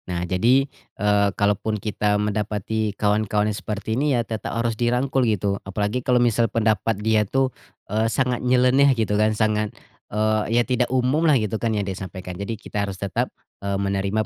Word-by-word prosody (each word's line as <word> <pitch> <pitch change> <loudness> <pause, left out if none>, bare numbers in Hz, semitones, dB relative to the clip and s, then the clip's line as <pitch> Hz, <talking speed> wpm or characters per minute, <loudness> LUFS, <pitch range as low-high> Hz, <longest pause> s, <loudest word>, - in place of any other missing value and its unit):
Nah 90 -1 -2
jadi, 120 +10 +3 0.3
eee, 105 0 +3
kalaupun 105 +1 +1
kita 105 -1 0
mendapati 105 0 -2
kawan-kawan 105 0 +1
yang - - -5
seperti 105 +1 -4
ini 145 -3 +2
ya, 120 - 0
tetap 110 +1 -4
harus 115 0 0
dirangkul 125 +4 0
gitu. 100 -1 -1
Apalagi 105 +5 -2
kalau 125 0 +2
misal 120 -1 +2
pendapat 110 0 +1
dia 110 -1 +4
tuh, 135 +2 0 0.3
eee, 110 +2 0
sangat 125 0 0
nyeleneh 130 +2 +4
gitu 110 -2 0
kan, 110 +1 +2
sangat, 105 -1 +1 0.4
eee, 110 +1 +1 0.2
iya 120 - +4
tidak 125 -1 0
umumlah 135 +4 +3
gitu 110 -1 -2
kan 115 -2 0
yang 100 - -1
dia 95 - -3
sampaikan. 95 -1 -7
Jadi 100 +5 -5
kita 105 0 -4
harus 95 - -6
tetap, 100 0 -2 0.3
eee, 100 0 -1
menerima 100 +2 -1
110 Hz, 175 wpm, -23 LUFS, 105-120 Hz, 0.4 s, dia